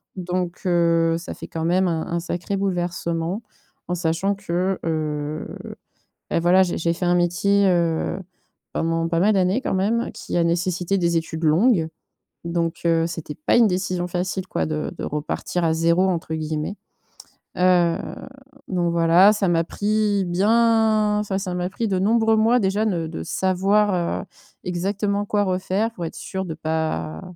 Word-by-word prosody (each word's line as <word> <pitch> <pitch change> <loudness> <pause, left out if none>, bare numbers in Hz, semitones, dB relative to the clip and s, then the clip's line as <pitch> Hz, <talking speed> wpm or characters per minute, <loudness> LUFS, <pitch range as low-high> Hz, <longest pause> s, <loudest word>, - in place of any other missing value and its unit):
Donc, 180 -1 -3
heu, 170 -2 +3
ça 170 - -7
fait - - -9
quand 165 0 -4
même 180 +2 +2
un 160 -2 -1
un 170 - -1
sacré 180 +3 -3
bouleversement 175 0 -2 0.4
en 180 - -2
sachant 170 +3 0
que, 185 -1 -1
heu, 155 -1 -2 0.8
bah, - - +1
voilà, 180 +2 +5
j'ai 175 - -3
j'ai 170 0 +1
fait 180 +1 -3
un 175 - +3
métier, 195 +3 +2
heu, 170 0 +1 0.5
pendant 165 0 0
pas 165 0 0
mal 210 +2 +4
d'années 190 +6 +2
quand - - -1
même 220 +5 0
qui - - -5
a 170 - +3
nécessité 175 +2 0
des 170 -1 +1
études 160 0 -5
longues. 165 +2 +3 0.6
Donc, 170 0 -2
heu, 165 -1 +3
c'était 160 -3 -6
pas 155 - +1
une 230 -2 +6
décision 180 -1 -1
facile 185 +1 -3
quoi - - -1
de 155 -1 -3
de - - -6
repartir 150 +3 -3
à 160 - +2
«0», 170 +3 +2
entre 165 -2 -2
guillemets. 155 +4 -3 0.8
Heu, 180 -2 +3 0.7
donc 175 -2 0
voilà, 170 +5 +6
ça 205 -2 0
m'a 165 -1 +2
pris 205 -1 0
bien 215 +2 +3
enfin 200 -2 -2
ça 190 -2 -4
m'a 180 0 -2
pris 225 +1 -2
de 190 - +1
nombreux 225 +2 +3
mois 230 +3 +4
déjà 205 +2 +1
de 170 -6 -1
de 80 - -6
savoir, 190 - +1
heu, - - -10 0.4
exactement 200 +3 -1
quoi 205 0 +1
refaire 190 +4 -1
pour 175 -5 -5
être - - -6
sûre 190 0 -5
de 165 - -4
pas 155 - -2
180 Hz, 165 wpm, -22 LUFS, 165-195 Hz, 0.8 s, une